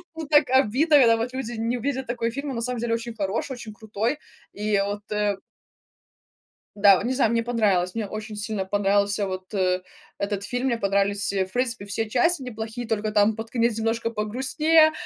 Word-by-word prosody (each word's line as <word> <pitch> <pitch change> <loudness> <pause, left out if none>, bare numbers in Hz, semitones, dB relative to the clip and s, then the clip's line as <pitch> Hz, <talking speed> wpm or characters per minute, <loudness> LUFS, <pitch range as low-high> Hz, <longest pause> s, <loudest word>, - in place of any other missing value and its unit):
Ну, 320 -2 -6
так 295 -2 +4
обидно, 270 +5 +4
когда 230 -4 +6
вот 235 +3 -3
люди 260 -2 -4
не 230 +2 -1
видят 265 +1 -2
такой 235 -1 -2
фильм, 280 +4 -4
а - - -4
на 230 - -3
самом 250 0 -2
деле 235 0 -1
очень 230 0 -4
хороший, 210 +6 -2
очень 235 -3 -8
крутой. 220 +5 -2 0.4
И 210 0 0
вот, 205 0 -4
э 210 -1 0 1.4
Да, 200 -2 +7
вот - - -3
не 255 - 0
знаю, 250 -4 +2
мне 230 0 +1
понравилось. 205 -7 +1
Мне 225 -2 -2
очень 215 +1 -7
сильно 205 -2 -3
понравился 200 +1 +1
вот, 185 +1 -6
э, 185 -2 +1 0.4
этот 200 0 -2
фильм, 245 +5 -2
мне 240 -3 +1
понравились, 200 -1 0
э, 190 -1 0
в 190 - -19
принципе, 245 -4 -1
все 225 +2 -2
части 265 +7 +1
неплохие, 230 0 -6
только 215 -1 -1
там 210 +1 +4
под 225 +1 -7
конец 230 -2 +1
немножко 225 +1 -1
погрустнее, 270 +9 +3
225 Hz, 195 wpm, -24 LUFS, 205-245 Hz, 1.4 s, Да